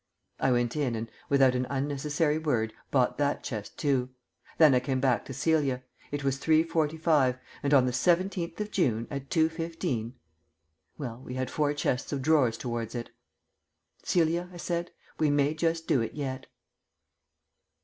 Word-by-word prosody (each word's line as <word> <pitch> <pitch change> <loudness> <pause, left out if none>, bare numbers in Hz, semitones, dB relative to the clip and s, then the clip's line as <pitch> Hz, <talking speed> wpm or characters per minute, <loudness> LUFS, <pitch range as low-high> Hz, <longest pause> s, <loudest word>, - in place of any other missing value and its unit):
I 135 - +2
went 120 0 +1
in 140 -6 0
and, 115 +1 -5 0.2
without 135 -2 +5
an 125 0 -1
unnecessary 145 +3 0
word, 120 -8 0 0.2
bought 130 -1 +1
that 145 0 0
chest 105 -4 -6
too. 130 -3 +1 0.5
Then 155 -4 +7
I 125 - +5
came 130 +1 -1
back 130 -2 +1
to 135 - -7
Celia. 140 -5 +1 0.3
It 145 -1 -3
was 135 -1 0
3.45, 155 -3 +2 0.2
and 140 - -1
on 135 -3 +6
the 125 - -1
seventeenth 175 +3 +1
of 210 0 -3
June 115 - +1
at 140 -1 -5
2.15 160 -7 -1 0.8
Well, 125 -4 -6
we 125 - -7
had 130 -1 -2
four 150 -2 +1
chests 125 -3 -1
of 140 -3 -2
drawers 135 -7 +3
towards 120 -2 -4
it. 120 -1 -5 0.9
"Celia," 170 +1 +1
I 175 - -10
said, 170 0 -2 0.3
"we 155 - +3
may 145 +1 +2
just 165 +1 -1
do 130 - +3
it 115 - -4
yet." 130 -2 -4
140 Hz, 160 wpm, -28 LUFS, 125-160 Hz, 0.9 s, Then